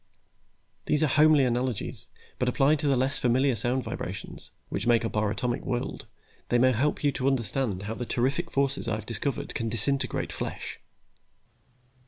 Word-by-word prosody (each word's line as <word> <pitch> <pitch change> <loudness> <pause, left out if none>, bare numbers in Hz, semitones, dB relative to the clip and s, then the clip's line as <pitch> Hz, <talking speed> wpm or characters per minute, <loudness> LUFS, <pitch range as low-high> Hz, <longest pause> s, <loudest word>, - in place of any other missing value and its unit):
These 150 +1 +3
are 145 - +2
homely 150 -2 +6
analogies, 125 -2 -2 0.3
but 125 - +2
applied 140 +4 +3
to 145 - 0
the 135 -2 +3
less 130 +2 +2
familiar 130 +2 +2
sound 125 +3 0
vibrations, - - -6 0.2
which - - -3
make 120 -1 +4
up 115 - -4
our 105 -1 +2
atomic 120 +3 -2
world, 120 -1 -3 0.4
they 120 - +3
may 130 +2 +5
help 135 +7 0
you 145 - +3
to 135 -1 -2
understand 115 -5 0
how 105 +2 -3
the 120 +2 -5
terrific 140 +8 0
forces 140 0 0
I 110 - 0
have 110 - -6
discovered 125 +3 -3
can 115 -1 -2
disintegrate 135 +5 0
flesh." - - -5
130 Hz, 170 wpm, -27 LUFS, 120-140 Hz, 0.4 s, homely